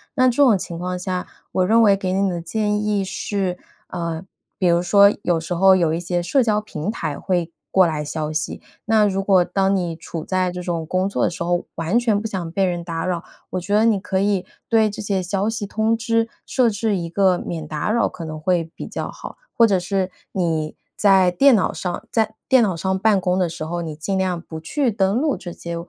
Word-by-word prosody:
那 255 -2 +4
这 250 - +4
种 230 -7 +5
情 170 -2 -6
况 180 +1 -3
下， 180 0 -3 0.3
我 185 - +2
认 225 +4 +4
为 200 -2 +6
给 190 -1 -3
你 195 +1 +1
的 175 -2 -3
建 210 +4 -1
议 210 -1 +1
是， 190 -1 -2 0.3
呃， 170 -1 -4 0.4
比 185 - +2
如 170 0 +3
说 200 +3 +6
有 175 -2 +1
时 165 +2 -4
候 190 +2 +6
有 165 -4 +2
一 165 - -1
些 175 0 -1
社 255 +9 +2
交 215 -2 +2
平 190 -2 -4
台 155 -9 -4
会 175 -3 -1 0.2
过 190 -1 +5
来 155 -2 -2
消 155 +1 -3
息， 155 0 -3 0.2
那 220 -1 +4
如 195 -1 0
果 190 -2 +4
当 195 +2 +1
你 175 -3 -2
处 165 0 -6
在 185 0 0
这 180 0 -6
种 170 -2 -2
工 185 +4 0
作 - - -1
的 - - +2
时 170 0 -5
候， 175 0 0
完 165 +7 0
全 220 -4 +1
不 - - -8
想 185 -6 -4
被 195 +3 0
人 175 -2 0
打 165 -1 -3
扰， 180 -2 -2 0.3
我 185 - -1
觉 190 +3 -4
得 215 - +4
你 220 -4 +3
可 190 0 -2
以 195 -2 +1 0.2
对 220 -2 +4
这 205 - -6
些 200 -2 -1
消 195 +4 -1
息 220 -2 -3
通 220 +2 0
知 230 0 0 0.2
设 250 -3 +2
置 215 0 -1
一 170 -2 -4
个 185 0 +3
免 160 -3 -5
打 150 +6 -2
扰 235 +1 +2
可 170 - -8
能 155 -1 -6
会 165 0 0
比 - - -7
较 - - -4
好。 - - -10 0.2
或 230 - +7
者 195 -3 +2
是 190 0 -1 0.2
你 160 -4 -1 0.2
在 190 -3 +5
电 270 +6 +5
脑 190 - +1
上 180 +4 -4
在 220 -1 0
电 260 -2 +6
脑 195 -5 0
上 190 +2 -1
办 210 -1 +3
公 180 0 +1
的 180 - +2
时 155 - -6
候， 170 +2 -3
你 160 -2 -5
尽 190 +6 -2
量 185 -2 -1
不 160 -2 -8
去 250 - 0
登 195 0 +1
录 290 +2 +1
这 175 - -8
些， 170 0 -6
185 Hz, 250 characters per minute, -21 LUFS, 170-210 Hz, 0.4 s, 或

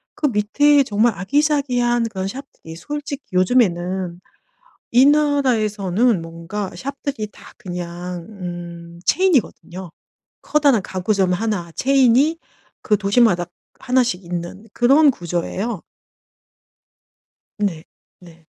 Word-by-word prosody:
그 300 - 0
밑에 280 +6 +3
정말 225 -1 +2
아기자기한 245 - +1
그런 190 -3 -4
shop들이 195 -7 -9
솔직히 290 - -6
요즘에는 185 -3 +1 0.7
이 250 +3 +6
나라에서는 240 - +2
뭔가 165 +5 -6
shop들이 275 -4 -5
다 - - -15
그냥 175 -3 -6
음 175 -3 -8
체인이거든요. 220 - 0 0.5
커다란 285 -8 +3
가구점 190 0 0
1 180 -3 -2
체인이 270 - +3 0.4
그 210 - +2
도시마다 200 -3 +2 0.3
1 260 0 +2
씩 235 -7 -2
있는 175 +4 -6
그런 275 +5 +5
구조예요. 180 +2 -3 1.8
네. 190 -7 -2 0.4
네. 170 -2 -17
210 Hz, 240 characters per minute, -20 LUFS, 180-265 Hz, 1.8 s, 이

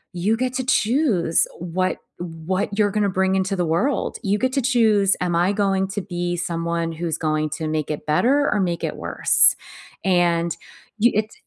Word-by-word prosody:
you 205 +6 0
get 255 0 -2
to 260 - -2
choose 225 - +2
what 180 +2 -2 0.2
what 175 +4 -3
you're 205 -2 +2
going 210 +1 -1
to 200 - +1
bring 190 0 0
into 190 +1 0
the 180 - -1
world. 175 - -1
You 200 +1 +1
get 260 +4 -1
to 275 - +1
choose, 220 -6 +3
'Am 175 -2 0
I 175 +3 +2
going 195 -2 0
to 205 0 -3
be 175 -1 -3
someone 170 -1 -2
who's 165 0 -3
going 155 -1 -1
to 155 +1 -4
make 155 -1 -2
it 150 - -5
better 260 - +2
or 210 - 0
make 175 -2 -2
it - - -2
worse?'" - - +4 0.5
And 170 -2 +1 0.4
you 235 +3 +4
it 215 +1 -1
185 Hz, 190 wpm, -22 LUFS, 170-210 Hz, 0.5 s, worse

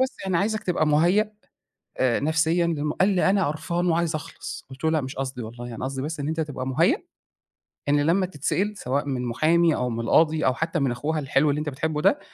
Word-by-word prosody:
بس 260 0 0
يعني 190 -2 0
عايزَك 215 +4 0
تبقى 175 -5 +1
مهيأ 175 +8 +3 0.7
آآ 125 -2 +2
نفسيًا 160 +3 +2
لم" 150 -3 -1
قال: 190 -1 +3
"أنا 195 -1 +3
قرفان 170 +4 -2
وعايز 170 -1 +1
أخلص." 155 - -6
قُلت 130 +3 -10
له: 160 - +3
"لأ، 160 -1 +2
مش 135 0 -6
قصدي 130 -2 -4
والله 120 +2 -8
يعني 115 0 -6
قصدي 135 0 -3
بس 155 +2 -4
إن 145 - -2
أنت 160 +1 -1
تبقى 145 -5 -4
مهيأ 165 - +2 0.9
إن 145 0 +4
لمّا 170 +6 +2
تتسئل 185 +5 -1
سواء 140 -3 -1
من 130 -3 -2
محامي 160 +7 +3
أو 125 - -1
من 115 -1 -3
قاضي 160 0 +3
أو 130 - +3
حتّى 165 +4 -2
من 135 -3 +1
أخوها 150 +6 -2
الحلو 145 +1 +2
اللي 145 +1 0
أنت 150 0 -2
بتحبه 150 +2 -2
ده 290 - +3
155 Hz, 215 wpm, -25 LUFS, 135-170 Hz, 0.9 s, إن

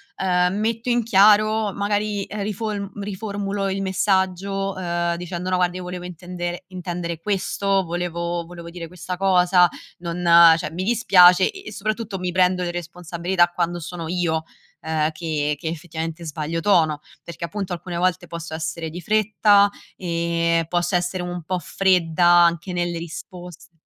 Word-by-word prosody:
ehm, 180 -1 +1
metto 225 +3 -1
in 240 0 +3
chiaro 215 0 +4
magari, 205 0 -1
ehm, 210 0 -6
rifolm 210 -1 -3
riformulo 200 0 -3
il 195 +1 -2
messaggio, 190 0 0
ehm, 170 -1 -1
dicendo: 180 +1 -5
"No 185 - +2
guarda 180 0 +1
io 185 - -6
volevo 180 0 -6
intendere 175 +1 -6
intendere 175 -2 -5
questo, 195 0 0
volevo 170 0 -3
volevo 170 -1 -10
dire 170 -1 -7
questa 180 +1 -6
cosa, 180 -1 +4 0.3
non 175 0 -4 0.3
cioè, 155 -2 -3
mi 180 +3 -4
dispiace." 185 -5 +6
E - - -25
e - - -6
soprattutto 215 0 -3
mi 180 -1 -2
prendo 180 0 +2
le 175 - -2
responsabilità 175 +1 -1
quando 175 0 -2
sono 170 0 -6
io, 165 -2 0 0.4
ehm, 160 -1 0
che 155 -2 -1
che - - -5
effettivamente 165 0 -5
sbaglio 160 +1 -3
tono, 160 -6 +2 0.2
perché 170 0 -8
appunto 195 -1 -4
alcune 175 0 -5
volte 180 0 0
posso 165 -1 -7
essere 160 0 -4
di 175 +3 -7
fretta, 210 +1 +4 0.3
ehm, 170 -1 0
posso 175 +2 0
essere 180 +1 -1
un 175 0 -5
po' 185 +3 -2
fredda 180 -2 +1
anche 175 +1 +4
nelle 175 -1 -2
risposte 175 +1 -9
180 Hz, 155 wpm, -22 LUFS, 170-195 Hz, 0.4 s, dispiace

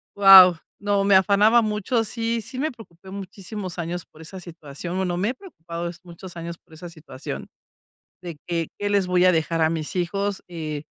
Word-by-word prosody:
¡guau!, 190 -3 +9 0.3
no 200 -1 +1
me 200 -1 +4
afanaba 205 +4 +5
mucho. 215 +2 -1
Sí, 230 +1 -2
sí 255 +3 -7
me 310 +2 -1
preocupé 190 -6 -15
muchísimos 195 -1 -7
años 170 +1 -4
por 155 - -18
esa 185 +4 -9
situación. 170 0 -8
Bueno, 180 -2 -1
me 200 +5 0
he - - -2
preocupado 170 - -7
muchos 175 +1 -11
años 170 0 -6
por - - -23
esa 175 +3 -9
situación 145 - -8 0.7
de 170 -3 -7
que 170 -2 -2
qué 205 - -1
les 200 -2 +2
voy 180 0 +2
a 185 - +6
dejar 165 0 0
a 160 - +3
mis 160 +3 -3
hijos, 195 +3 -2
eh, 155 -4 -5
180 Hz, 185 wpm, -23 LUFS, 170-205 Hz, 0.7 s, guau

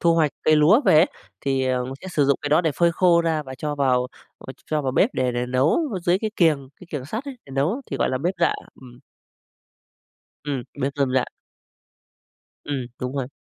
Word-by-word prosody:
thu 170 -1 +4
hoạch 155 -3 +3
cây 155 0 +4
lúa 175 - +6
về - - +5
ấy, 165 +5 +6 0.3
thì, 135 -1 0
ờ, 125 -1 0
mình 130 +1 -6
sẽ 190 - -8
sử 150 -5 +1
dụng 140 0 +3
cái 145 - -2
đó 155 +3 +5
để 160 -3 +1
phơi 170 +2 +2
khô 170 -1 +4
ra 160 -2 0
và 130 -2 -8
cho 150 -1 -2
vào, 130 -3 +2 0.3
ờ, 130 - -9
ch - - -28
cho 155 -1 +1
vào 130 -2 -1
bếp 215 - +3
để 130 -1 0
để 120 +1 -2
nấu 130 - +2 0.2
dưới 175 +2 +3
cái 215 +1 -2
kiềng, 150 -6 +2
cái 180 - -12
kiềng 145 -4 -4
sắt 220 - -5
ấy, 270 -3 -8
để - - -13
nấu 160 - 0
thì 135 - -2
gọi - - +1
là 130 - -1
bếp 175 +7 -1
rạ. 170 - +3 0.3
Ừm. 125 -1 -14 1.4
Ừm, 140 -4 -3 0.2
bếp 135 +1 -1
rơm 140 -2 +1
rạ. 130 - +3 1.4
Ừm, 145 - -3 0.2
đúng 125 +1 -4
rồi. 135 -3 -2
145 Hz, 230 wpm, -23 LUFS, 130-170 Hz, 1.4 s, lúa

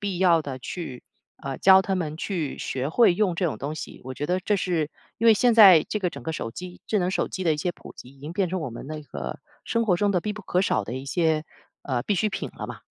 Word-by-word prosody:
必 200 -4 -3
要 175 -3 +4
的 135 -3 -6
去， 130 -1 -6 0.4
呃， 135 -1 -4
教 190 0 +7
他 195 - -1
们 160 -5 -3
去 165 -5 -3
学 130 +1 -3
会 185 +2 +4
用 185 -2 +1
这 185 - 0
种 155 - -3
东 145 +3 -4
西。 - - -8
我 130 0 -6
觉 145 - -3
得 180 +2 0
这 205 +3 +1
是 170 -5 -1 0.3
因 230 - +1
为 225 - +8
现 240 +2 +3
在 195 -8 +9
这 210 - -1
个 180 -3 0
整 - - -9
个 160 - -2
手 115 -7 -4
机 180 +8 -9
智 215 - +2
能 180 0 0
手 - - -1
机 185 - -5
的 165 - +3
一 - - -5
些 175 +4 -1
普 - - -13
及 - - -11
已 135 +1 -18
经 150 +4 -7
变 185 0 0
成 185 0 -2
我 145 - -4
们 115 - -8
那 155 0 -5
个 70 - -6 0.3
生 230 0 0
活 185 -5 +3
中 205 +2 +1
的 180 - +1
必 210 +4 -3
不 210 0 -9
可 180 0 0
少 110 - +1
的 115 - -5
一 130 +1 -5
些， 160 +2 +1 0.4
呃， 125 -3 -2
必 200 - 0
需 205 +4 +1
品 205 - -5
了 - - -5
嘛。 - - -8
175 Hz, 300 characters per minute, -25 LUFS, 145-190 Hz, 0.4 s, 在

